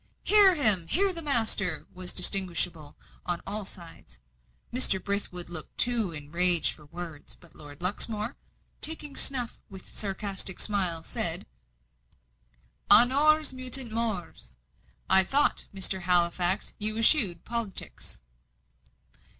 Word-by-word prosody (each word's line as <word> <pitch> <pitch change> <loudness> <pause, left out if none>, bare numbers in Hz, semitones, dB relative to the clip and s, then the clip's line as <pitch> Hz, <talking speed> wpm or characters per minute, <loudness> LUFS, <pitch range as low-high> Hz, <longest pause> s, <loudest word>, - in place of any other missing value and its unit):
"Hear 400 -3 +4
him! 210 - +3
hear 390 - +1
the 335 - -4
master!" 220 - 0
was 180 0 -3
distinguishable 175 -5 +2 0.3
on 175 -1 -4
all 205 +1 -7
sides. 165 - -12 0.5
Mr. 240 -6 +2
Brithwood 200 -3 -5
looked 170 -3 -8
too 235 -6 +2
enraged 170 +3 +2
for 150 -2 -19
words; 165 -2 -9
but 170 -3 -21
Lord 145 +2 -13
Luxmore, 215 +5 -2 0.5
taking 300 -3 +2
snuff 250 -4 -2
with 190 -2 -12
a - - -13
sarcastic 195 -2 -4
smile, 185 -6 -1
said: - - -3 1.4
"Honores 290 +4 +5
mutant 255 -1 -1
mores! 205 - -6 0.5
I 190 0 +8
thought, 275 +9 -1
Mr. 190 -1 -3
Halifax, 175 +1 +3
you 215 +1 -2
eschewed 220 - +1
politics?" 220 - -7
195 Hz, 115 wpm, -26 LUFS, 175-235 Hz, 1.4 s, I